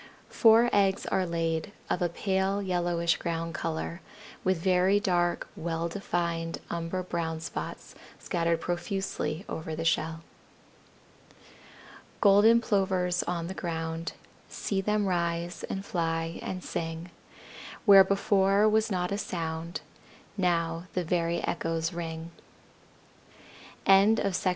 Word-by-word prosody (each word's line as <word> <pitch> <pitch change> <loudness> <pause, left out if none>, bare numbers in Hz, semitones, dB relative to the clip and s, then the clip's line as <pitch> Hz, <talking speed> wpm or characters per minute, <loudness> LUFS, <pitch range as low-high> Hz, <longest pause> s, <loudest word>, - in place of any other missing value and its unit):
Four 230 +1 +6
eggs 195 -1 +2
are 185 -1 0
laid, 165 +3 -2
of 180 - -1
a 175 - +2
pale 190 +2 0
yellowish 175 -3 0
ground 165 0 -3
color, 165 +2 -3 0.4
with 185 -1 +2
very 185 +3 +3
dark, 175 -3 0
well 165 0 -2
defined 170 -2 -2
umber 170 +2 -2
brown 165 -2 -3
spots 160 - -6 0.2
scattered 170 -1 0
profusely 180 0 -3
over 160 0 -5
the 165 +1 -4
shell. 165 0 0 2.0
Golden 210 +3 +6
Plovers 185 -4 +1
on 170 -1 -2
the 185 - -5
ground, 165 -2 -4 0.4
See 195 -2 -2
them 210 +1 +1
rise, 170 -1 -1
and 195 0 -4
fly, 165 -1 -2
and 185 -1 -5
sing; 165 +1 -4 0.7
Where 195 -3 +9
before 200 +1 +3
was 220 +1 +2
not 180 -2 -1
a 200 - -1
sound 165 -2 -4 0.5
Now 170 -2 0
the 180 - +1
very 170 0 0
echoes 165 0 -1
ring. 165 -1 -5 1.5
CAN 195 +3 +6
ANIMALS 195 -4 0
COUNT? - - +5
175 Hz, 120 wpm, -28 LUFS, 165-195 Hz, 2.0 s, Where